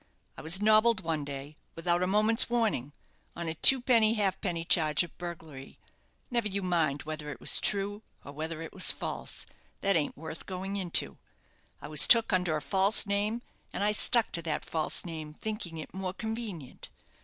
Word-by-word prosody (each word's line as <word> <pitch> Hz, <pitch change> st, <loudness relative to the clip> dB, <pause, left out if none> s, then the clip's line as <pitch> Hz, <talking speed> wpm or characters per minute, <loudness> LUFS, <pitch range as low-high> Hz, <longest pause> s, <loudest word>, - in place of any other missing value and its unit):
I -, -, -10 dB
was 165 Hz, +4 st, +3 dB
nobbled 215 Hz, 0 st, +3 dB
one 160 Hz, -3 st, -3 dB
day, 140 Hz, +1 st, -9 dB, 0.2 s
without 175 Hz, +1 st, -1 dB
a 180 Hz, -, 0 dB
moment's 215 Hz, +5 st, +2 dB
warning, 220 Hz, -, -1 dB, 0.4 s
on 170 Hz, -1 st, -6 dB
a 160 Hz, -, -3 dB
twopenny 230 Hz, +3 st, +5 dB
halfpenny 185 Hz, -5 st, -2 dB
charge 155 Hz, -2 st, +2 dB
of 175 Hz, -, -12 dB
burglary 160 Hz, -6 st, -10 dB, 0.5 s
never 235 Hz, -3 st, -1 dB
you 200 Hz, -1 st, -4 dB
mind 165 Hz, -6 st, -1 dB
whether 155 Hz, -1 st, -7 dB
it 130 Hz, -5 st, -8 dB
was -, -, +4 dB
true, 205 Hz, +1 st, -1 dB, 0.2 s
or 140 Hz, -, -9 dB
whether 160 Hz, +2 st, -6 dB
it 160 Hz, -, -10 dB
was 190 Hz, -, +5 dB
false -, -, -3 dB, 0.4 s
that 195 Hz, -1 st, +1 dB
ain't 150 Hz, -3 st, -2 dB
worth 160 Hz, +1 st, -9 dB
going 190 Hz, +1 st, -6 dB
into. 185 Hz, -4 st, -1 dB, 0.6 s
I -, -, -7 dB
was 150 Hz, 0 st, +6 dB
took 230 Hz, -3 st, +5 dB
under 180 Hz, -4 st, 0 dB
a 150 Hz, -, -8 dB
false 195 Hz, +8 st, +4 dB
name, 210 Hz, +4 st, -2 dB, 0.3 s
and -, -, -4 dB
I 210 Hz, -, +2 dB
stuck 225 Hz, +2 st, +5 dB
to 170 Hz, -, 0 dB
that 160 Hz, -2 st, -4 dB
false 160 Hz, +2 st, 0 dB
name, 155 Hz, -3 st, -8 dB
thinking 210 Hz, -6 st, -6 dB
it 155 Hz, -, -9 dB
more 185 Hz, -1 st, -5 dB
convenient. 220 Hz, -, -8 dB
180 Hz, 180 wpm, -28 LUFS, 155-210 Hz, 0.6 s, was